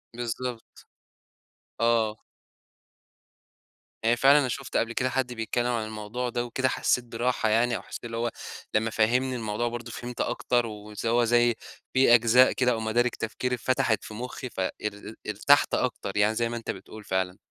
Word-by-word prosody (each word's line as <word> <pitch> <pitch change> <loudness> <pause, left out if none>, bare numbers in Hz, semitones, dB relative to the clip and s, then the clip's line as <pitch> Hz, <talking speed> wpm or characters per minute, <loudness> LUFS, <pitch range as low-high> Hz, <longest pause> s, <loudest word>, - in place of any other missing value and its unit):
بالضبط. 120 0 -4 1.2
آه. 115 -2 +2 1.9
يعني 115 +2 +3
فعلًا 140 +4 +6
أنا 135 - +1
شُفت 130 +1 -3
قبل 115 0 0
كده 125 +2 0
حد 130 -1 -1
بيتكلّم 120 +1 -1
عن 115 -3 -1
الموضوع 110 +3 -4
ده 120 0 -2
وكده، 130 +2 0
حسّيت 125 - +1
براحة 120 -1 0
يعني، 120 +2 +3
أو - - -4
حسّيت - - -9
إن 115 - -7
هو 115 +1 0 0.4
لمّا 110 +1 +2
فهّمني 125 +4 +1
الموضوع 110 0 -2
برضه 120 0 -5
فهمت 120 +1 -5
أكتر. 120 -1 0
ونس 105 0 -7
هو 120 +1 +3
زي 120 0 +3 0.4
في 130 -2 +6
أجزاء 120 +2 +6
كده، 125 -1 +2
أو 115 - -1
مَدارِك 115 +2 +1
تفكري 125 +3 -2
اتفتحت 120 -3 +1
في - - -9
مُخّي، 125 +3 -6
ف - - -9
ار 95 - 0 0.6
ارتحت 110 +8 +4
أكتر. 110 -5 -1
يعني 105 +2 +3
زي 115 +1 0
ما 120 - -3
أنت 115 - -4
بتقول 105 +3 -11
فعلًا. 95 -1 -1
120 Hz, 170 wpm, -27 LUFS, 110-125 Hz, 1.9 s, فعلًا